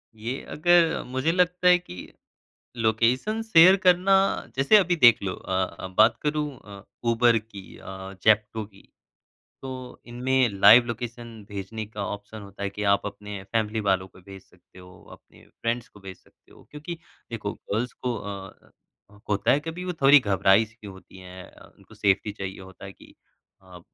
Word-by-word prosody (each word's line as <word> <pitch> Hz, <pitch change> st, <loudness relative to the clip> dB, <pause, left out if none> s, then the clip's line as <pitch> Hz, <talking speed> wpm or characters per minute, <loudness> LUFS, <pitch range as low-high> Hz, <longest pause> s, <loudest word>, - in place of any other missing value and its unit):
ये 115 Hz, +5 st, -5 dB
अगर 170 Hz, +1 st, +3 dB
मुझे 130 Hz, +6 st, -1 dB
लगता 180 Hz, 0 st, +1 dB
है 180 Hz, 0 st, +7 dB
कि 90 Hz, -, -12 dB, 0.6 s
लोकेशन 120 Hz, -, 0 dB
शेयर 185 Hz, -3 st, +6 dB
करना 180 Hz, +2 st, +4 dB, 0.4 s
जैसे 135 Hz, +11 st, +5 dB
अभी 180 Hz, -3 st, +2 dB
देख 120 Hz, -8 st, +5 dB
लो 95 Hz, -2 st, -3 dB
अ, 95 Hz, -1 st, -4 dB
बात 110 Hz, -, +5 dB
करूँ 150 Hz, 0 st, -1 dB, 0.2 s
अ, 100 Hz, -1 st, -12 dB, 0.3 s
ऊबर 115 Hz, 0 st, +3 dB
की 100 Hz, -3 st, -13 dB
अ, 95 Hz, 0 st, -9 dB
ज़ेप्टो 110 Hz, 0 st, +2 dB
की। 100 Hz, -1 st, -20 dB, 0.7 s
तो 130 Hz, -1 st, -9 dB
इनमें 125 Hz, +1 st, 0 dB
लाइव 115 Hz, +5 st, +8 dB
लोकेशन 115 Hz, -1 st, -7 dB
भेजने 105 Hz, +2 st, -6 dB
का 105 Hz, -2 st, -6 dB
ऑप्शन 105 Hz, +1 st, -8 dB
होता 100 Hz, 0 st, -10 dB
है 100 Hz, -, -2 dB
कि 105 Hz, +1 st, -6 dB
आप 100 Hz, -, -2 dB
अपने 105 Hz, -1 st, -7 dB
फ़ैमिली 110 Hz, +2 st, -2 dB
वालों 95 Hz, -2 st, 0 dB
को 95 Hz, -, -19 dB
भेज 95 Hz, 0 st, -12 dB
सकते 90 Hz, 0 st, -21 dB
हो, 90 Hz, 0 st, -16 dB
अपने -, -, -18 dB, 0.2 s
फ्रेंड्स 115 Hz, +1 st, -2 dB
को 105 Hz, -, -18 dB
भेज 95 Hz, -1 st, -11 dB
सकते -, -, -29 dB
हो, -, -, -18 dB
क्योंकि 155 Hz, +3 st, -8 dB, 0.3 s
देखो 105 Hz, -3 st, -4 dB
गर्ल्स 115 Hz, +4 st, -4 dB
को 125 Hz, -2 st, -4 dB
अ, 100 Hz, -2 st, -10 dB, 0.6 s
होता 100 Hz, -1 st, +1 dB
है 140 Hz, -, +3 dB
कभी 165 Hz, +4 st, -7 dB
वो 180 Hz, -, -3 dB
थोड़ी 140 Hz, +1 st, +7 dB
घबराई 100 Hz, 0 st, +3 dB
की 110 Hz, -1 st, -15 dB
होती 95 Hz, 0 st, -14 dB
हैं 90 Hz, 0 st, -11 dB
अ, -, -, -17 dB
उनको -, -, -19 dB
सेफ़्टी 100 Hz, +1 st, 0 dB
चाहिए 95 Hz, -2 st, -7 dB
होता 95 Hz, +1 st, -13 dB
है 95 Hz, -, -9 dB
कि -, -, -19 dB, 0.5 s
अ, 90 Hz, -2 st, -14 dB
110 Hz, 170 wpm, -25 LUFS, 100-130 Hz, 0.7 s, लाइव